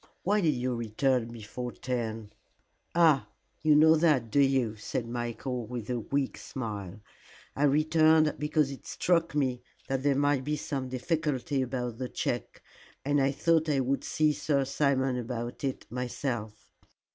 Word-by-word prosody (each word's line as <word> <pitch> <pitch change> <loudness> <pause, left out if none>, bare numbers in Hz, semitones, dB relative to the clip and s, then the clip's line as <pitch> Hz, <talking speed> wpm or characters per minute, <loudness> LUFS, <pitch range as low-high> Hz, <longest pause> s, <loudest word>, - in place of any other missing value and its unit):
"Why 205 +3 +2
did 155 -5 +2
you 125 +1 -1
return 120 +2 0
before 120 +2 -6
ten?" 115 -4 -4 0.6
"Ah, 160 -5 +4 0.3
you 155 -1 +5
know 160 +2 +7
that, 150 -8 +2
do 145 - +3
you?" 135 -5 +2
said 115 +3 -4
Michael, 120 0 -4
with 120 -1 -5
a 120 - 0
weak 135 +4 -2
smile. 105 -6 -6 0.5
"I 145 - +2
returned 155 +1 +4
because 150 -1 +1
it 135 - -10
struck 170 -3 +1
me 130 -4 0 0.3
that 135 -1 0
there 140 0 +2
might 145 -1 +2
be 150 +3 -1
some 135 -3 -4
difficulty 140 0 -1
about 125 -2 -3
the 130 -1 -3
check, - - -3 0.4
and 145 0 +2
I 135 0 +3
thought 160 +2 +2
I 140 -2 +2
would 135 +2 -1
see 155 -1 +2
Sir 140 -2 0
Simon 135 -2 +1
about 120 +1 -5
it 135 -2 -3
myself. 120 -3 -4
135 Hz, 155 wpm, -29 LUFS, 120-150 Hz, 0.6 s, know